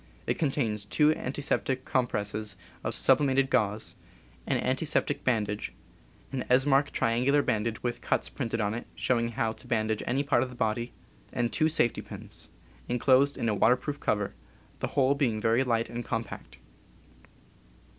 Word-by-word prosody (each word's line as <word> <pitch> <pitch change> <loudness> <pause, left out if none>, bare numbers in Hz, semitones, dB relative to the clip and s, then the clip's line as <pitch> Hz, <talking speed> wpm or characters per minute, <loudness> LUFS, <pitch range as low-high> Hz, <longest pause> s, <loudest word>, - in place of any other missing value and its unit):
It - - -1
contains 130 -9 0
two 150 +9 +3
antiseptic 130 -1 -2
compresses 105 -4 -1 0.3
of - - -2
subli - - +4
mated 135 0 +2
gauze, 105 -3 0 0.5
an - - +2
antiseptic 145 +1 0
bandage, 105 -4 0 0.6
an 135 -2 -2
Esmarch 135 +2 +4
tri 115 - +1
angular 140 +5 +3
bandage 110 +1 -1
with 120 -1 -2
cuts - - 0
printed 115 -4 -3
on 105 -1 0
it 120 - -5
showing 115 -2 0
how 110 0 0
to - - -12
bandage 110 -2 0
any 135 +3 +1
part 140 -4 +2
of 130 - -1
the 125 - -10
body, 120 0 -1 0.4
and 120 -1 0
two 155 0 +3
safety 120 -7 +1
pins, - - -10 0.4
inclosed 130 +3 +3
in 115 - -1
a 110 - +2
waterproof 125 +7 +2
cover, 105 -2 0 0.5
the - - -1
whole 135 0 +3
being 130 -7 0
very 115 +4 +3
light 115 -3 +1
and 120 +1 -5
compact. 115 -2 -5
120 Hz, 155 wpm, -29 LUFS, 110-135 Hz, 0.6 s, subli